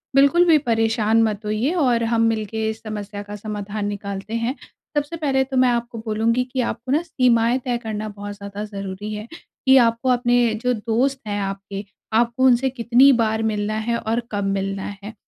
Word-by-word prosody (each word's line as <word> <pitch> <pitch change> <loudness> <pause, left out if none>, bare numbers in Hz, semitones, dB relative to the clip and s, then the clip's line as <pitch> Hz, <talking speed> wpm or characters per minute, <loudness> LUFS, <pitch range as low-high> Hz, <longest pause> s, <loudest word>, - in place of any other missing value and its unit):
बिल्कुल 280 +6 +5
भी 330 -3 +6
परेशान 225 -1 +2
मत 215 -2 0
होइए 215 +7 0
और 250 -9 +2
हम 230 0 +1
मिलके 220 -1 0
इस 220 0 -6
समस्या 210 -2 -6
का 205 0 -8
समाधान 210 0 -5
निकालते 200 +1 -5
हैं। 230 +3 -1 0.4
सबसे 290 +3 -1
पहले 275 -4 +1
तो 265 0 -4
मैं 255 0 +5
आपको 235 -1 -2
बोलूँगी 230 +3 +1
कि 260 - +1
आपको 240 +1 -3
ना 300 +4 +3
सीमाएँ 250 -6 +2
तय 245 -2 0
करना 215 0 -3
बहुत 205 0 -7
ज़्यादा 200 0 -7
ज़रूरी 200 0 -6
है, 210 +1 -6 0.4
कि 265 0 +8
आपको 230 0 +3
अपने 245 -2 +3
जो 250 0 +2
दोस्त 240 +5 0
हैं 205 0 -2
आपके, 195 0 -5 0.3
आपको 235 +3 +2
उनसे 255 +1 +4
कितनी 250 +2 +5
बार 225 -2 +1
मिलना 210 -1 -1
है? 235 +2 -1
और 225 +1 -1
कब 205 -1 -1
मिलना 195 +1 -3
है? 210 +2 -7
225 Hz, 185 wpm, -22 LUFS, 210-250 Hz, 0.4 s, कि